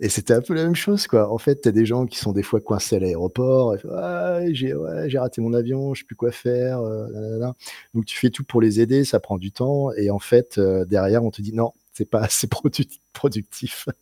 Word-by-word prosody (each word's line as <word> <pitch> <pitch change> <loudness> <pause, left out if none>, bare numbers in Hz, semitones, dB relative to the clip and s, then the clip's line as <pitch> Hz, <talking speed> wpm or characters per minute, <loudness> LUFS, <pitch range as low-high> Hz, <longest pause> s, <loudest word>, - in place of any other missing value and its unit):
et 105 - 0
c'était 105 +4 +3
un 120 - +3
peu 175 - -3
la 160 0 +1
même 170 +1 +3
chose, 205 +4 +1
quoi. 110 -2 +3
En 115 - 0
fait, 140 +5 +1
tu - - +5
as - - +4
des 110 +2 +5
gens 120 +3 +1
qui 125 +2 -7
sont 105 -6 -2
des 100 0 0
fois - - 0
coincés - - -1
à - - +3
l'aéroport, 115 +8 +2
ils 95 - -6
font: 155 - -14
«Ah 175 -1 -2
j'ai 130 -2 -2
ouais 80 - -4
j'ai 135 - +1
raté 125 -2 -3
mon 115 +1 -1
avion, 135 +3 -1
je - - -9
sais - - -18
plus - - -16
quoi 120 - 0
faire, 125 +1 -1
heu, 110 -1 -5
nana, 105 - -10
nana», - - -7
bon, 110 - -4
voilà, 125 +2 -4 0.4
donc 115 -1 -1
tu - - -6
fais 125 - +3
tout 140 - -7
pour 120 -4 +2
les 110 0 +4
aider, 130 +4 +5
ça 135 - +2
prend 100 -3 -5
du 95 +2 -8
temps 135 +4 0
et 100 -1 0
en 100 - -1
fait, 120 +1 +3
heu, 95 -2 +3
derrière 105 +4 +3
on 110 - 0
te 105 0 -14
dit: 110 - -7
«Non, 115 0 0 0.2
c'est - - -3
pas - - +1
assez - - +2
produti - - -2
productif, 110 -7 -4
120 Hz, 280 wpm, -22 LUFS, 105-130 Hz, 0.4 s, tu